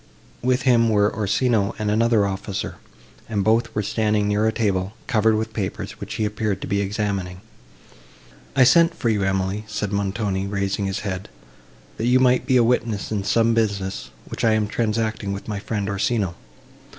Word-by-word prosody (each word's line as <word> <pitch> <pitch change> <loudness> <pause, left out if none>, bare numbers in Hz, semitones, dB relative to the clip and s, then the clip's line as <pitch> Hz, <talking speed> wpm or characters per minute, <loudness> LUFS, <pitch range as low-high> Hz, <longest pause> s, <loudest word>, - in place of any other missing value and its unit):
With 125 +1 +1
him 120 -3 +4
were 105 -1 +2
Orsino 105 0 +1
and 105 -1 -1
another 115 -1 +3
officer, 100 0 -4 0.5
and 105 -3 0
both 115 +1 +1
were 105 - 0
standing 105 0 +1
near 105 +1 +2
a - - +2
table, 100 -3 -1
covered 110 -3 +2
with 110 0 -2
papers, 100 -3 -4
which 110 +2 -6
he 110 -1 0
appeared 105 -2 -2
to - - -5
be 100 +1 0
examining. 100 -3 -2 1.2
"I 135 - +6
sent 170 +7 +5
for 120 - -1
you, 105 -3 +1
Emily," 95 +2 -1
said 105 -1 -3
Montoni, 100 -1 -1
raising 100 0 -1
his 95 +1 -3
head, 95 -1 -4 0.7
"that 115 - -1
you 125 +1 +5
might 125 -1 +3
be 130 -2 +4
a 120 - +5
witness 115 -4 0
in 105 -2 -1
some 115 +3 +2
business, 100 -4 -1 0.2
which - - -6
I 110 - +4
am 110 -1 +2
transacting 110 -2 -1
with 100 - -7
my 105 -2 -3
friend 105 -1 -3
Orsino. 100 -1 0
105 Hz, 175 wpm, -22 LUFS, 100-115 Hz, 1.2 s, I